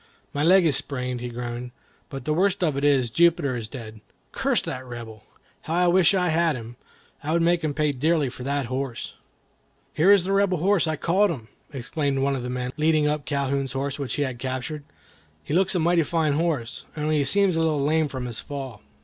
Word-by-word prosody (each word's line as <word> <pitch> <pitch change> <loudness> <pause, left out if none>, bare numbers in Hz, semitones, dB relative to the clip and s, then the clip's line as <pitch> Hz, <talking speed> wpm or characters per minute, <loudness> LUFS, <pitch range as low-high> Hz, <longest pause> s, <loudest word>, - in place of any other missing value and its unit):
"My 145 - -1
leg 185 +2 +6
is 150 -4 +3
sprained," 125 -3 -2
he 125 - -4
groaned; 120 +1 -5 0.4
"but 135 -4 -7
the 155 - +1
worst 190 +3 +1
of 155 -5 +1
it 140 - -2
is, 135 -5 +3
Jupiter 165 -4 +3
is 115 -3 -4
dead. 110 -3 -9 0.3
Curse - - +1
that 130 -1 -5
Rebel! 115 -3 -9 0.4
how 160 - -2
I 180 0 +3
wish 185 +1 +4
I 180 -2 +2
had 165 -1 +2
him! 120 0 -8 0.5
I 155 +2 -2
would 170 0 +2
make 170 0 +2
him 150 -2 -1
pay 150 -1 +1
dearly 150 +2 +1
for 125 - -8
that 140 0 -1
horse." 130 0 -4 0.8
"Here 180 +6 +4
is 200 -3 +6
the 195 +2 -1
Rebel's 195 -4 +2
horse. 190 -2 +3
I 155 - 0
caught 190 +7 +2
him!" 120 -9 -6 0.2
exclaimed 140 +1 -2
one 135 +1 +1
of 130 - -3
the 125 - -5
men, 125 0 -3
leading 155 -1 +3
up 150 -1 -1
Calhoun's 140 -2 -1
horse, 140 +1 -3
which 140 -3 -2
he 145 - 0
had 130 -3 -4
captured. 130 +3 -4 0.6
"He - - -5
looks 190 +2 +3
like 175 - +2
a - - 0
mighty 170 0 +3
fine 160 -2 +1
horse, 145 -6 -2
only 155 0 +1
he - - +2
seems 200 +3 +3
a - - +1
little 160 -2 +1
lame 155 +1 +2
from 130 -3 -5
his 120 -2 -4
fall." 135 -6 -7
145 Hz, 220 wpm, -24 LUFS, 130-165 Hz, 0.8 s, leg